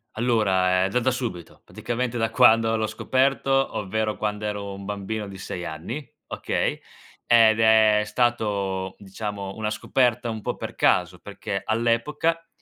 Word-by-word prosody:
Allora, 95 -6 +2
ehm, 95 - -1
da 125 - +2
da 130 +2 +1
subito. 120 -10 -5
Praticamente 120 0 -3
da 115 0 +1
quando 115 0 +4
l'ho 110 - 0
scoperto, 130 +4 0 0.3
ovvero 110 +1 -2
quando 105 0 -3
ero 100 -1 -4
un 100 0 -9
bambino 105 +1 -4
di 95 -1 -10
6 90 -2 -6
anni, 85 - -6 0.2
okay, - - -2 0.5
ed 115 -2 +5
è 110 -1 +5
stato 100 -5 -1
diciamo 100 0 -6
una 110 -1 -3
scoperta 120 +1 0
un 110 -1 -5
po' - - -2
per - - -7
caso, 90 0 +2
perché 100 0 -6
all'epoca 120 +9 0
110 Hz, 145 wpm, -24 LUFS, 100-115 Hz, 0.5 s, ed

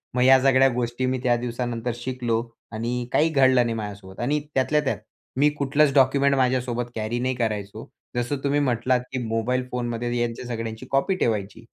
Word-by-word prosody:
मग 125 - +2
या 130 0 +7
सगळ्या 135 0 +5
गोष्टी 120 +1 -2
मी 130 0 0
त्या 120 -1 +3
दिवसानंतर 120 0 -3
शिकलो. 120 -2 -2 0.3
आणि 120 +2 -3
काही 160 +2 +3
घडलं 130 -4 +4
नाही 115 - -1
माझ्यासोबत 100 -3 -7
आणि 145 +6 +1
त्यातल्या 150 +3 +2
त्यात 125 -6 0 0.4
मी 150 +1 +5
कुठलंच 145 +1 +2
डॉक्युमेंट 140 +1 +4
माझ्यासोबत 125 -2 0
कॅरी 110 +2 -2
नाही 130 +1 -1
करायचो. 105 -4 -3 0.3
जसं 120 +4 -1
तुम्ही 145 +1 +2
म्हटलात, 125 -2 +1
की 130 - -3
मोबाईल 125 +3 -1
फोनमध्ये 120 0 -2
यांच्या 120 +1 -3
सगळ्यांची 115 -2 -5
कॉपी 140 +8 +2
ठेवायची. 110 - -2
125 Hz, 170 wpm, -24 LUFS, 115-130 Hz, 0.4 s, या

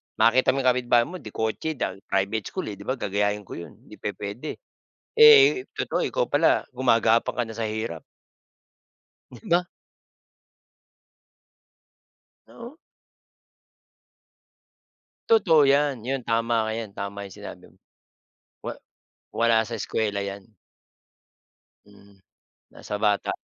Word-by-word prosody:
makita 125 +4 +3
mo 135 - -1
'yong 130 - +5
kapitbahay 120 -1 +2
mo 185 +1 -8
de-kotse 110 - -3
dahil 115 - -4
private 100 +2 -1
school, - - -5
eh, 100 - -10
'di 100 - -12
ba, 130 - 0
gagayahin 105 -1 -1
ko - - -11
'yon, 85 - -10
hindi - - -16
pupuwede. 105 +9 -5 0.6
Eh, 445 -4 +7 0.2
totoo - - -1
ikaw - - -1
pala - - +2
gumagapang 115 -2 +2
ka 120 - +1
na 110 - -9
sa 115 0 -3
hirap. 110 -7 -4 1.3
Di 120 - -13
ba? 175 +1 +3 2.8
Oo. 240 +5 -12 2.5
Totoo 165 -10 +5
'yan. 140 -4 +2
'Yon, 135 +1 -2
tama 115 -1 0
ka. - - -2
'Yan, 110 -3 -6
tama 100 0 -6
'yong 95 - -11
sinabi - - -10
mo. - - -29 0.8
Wa - - -6 0.6
wala 115 -1 +2
sa 115 0 -6
eskuwela 105 -1 -2
'yan. 100 0 -5 1.4
Mm, 100 -1 -20 0.5
nasa 105 - -6
bata. 105 -1 +1
115 Hz, 120 wpm, -25 LUFS, 105-130 Hz, 2.8 s, Eh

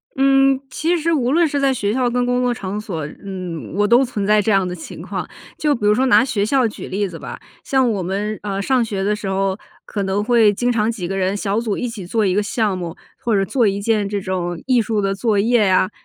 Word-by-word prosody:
嗯， 270 0 +4
其 325 +6 0
实 335 +1 0
无 255 -5 +1
论 335 +3 +4
是 285 -1 -1
在 275 -1 +2
学 205 -4 -1
校 250 0 +1
跟 245 +1 0
工 245 0 +1
作 250 -1 +1
场 200 -2 -4
所， 170 -8 -4 0.2
嗯， 185 -5 -6
我 205 +1 +2
都 240 +4 +5
存 220 -6 -3
在 210 +1 +4
这 215 - 0
样 195 -2 +3
的 180 - -4
情 160 - -9
况。 - - -5 0.3
就 295 -2 +2
比 210 - -3
如 210 - +5
说 255 +5 +2
拿 255 - +6
学 215 -6 -1
校 255 +1 +2
举 215 - -8
例 200 +2 -1
子 170 -3 -9
吧， - - -8 0.2
像 265 -2 +2
我 200 -3 -2
们， 200 +4 -3
呃， 200 -1 -3
上 255 +4 +2
学 200 -4 -3
的 210 +2 +1
时 210 -1 -6
候， 190 0 0 0.3
可 205 - -4
能 195 +2 0
会 225 -2 +4
经 245 +5 0
常 220 -2 +1
几 195 -7 -5
个 195 +2 -3
人 190 +1 0
小 205 +1 -1
组 225 -3 -2
一 245 - -2
起 220 -6 -7
做 220 +3 +1
1 185 - +2
个 205 - +2
项 210 -1 0
目， 170 -2 -5 0.3
或 230 -3 +1
者 215 +5 +2
1 200 0 0
件 210 -1 +1
这 205 0 -1
种 180 -3 -3
艺 255 -2 +3
术 215 -1 -1
的 195 0 0
作 210 +1 0
业 220 +1 +3
啊。 185 0 +3
210 Hz, 265 characters per minute, -20 LUFS, 195-245 Hz, 0.3 s, 拿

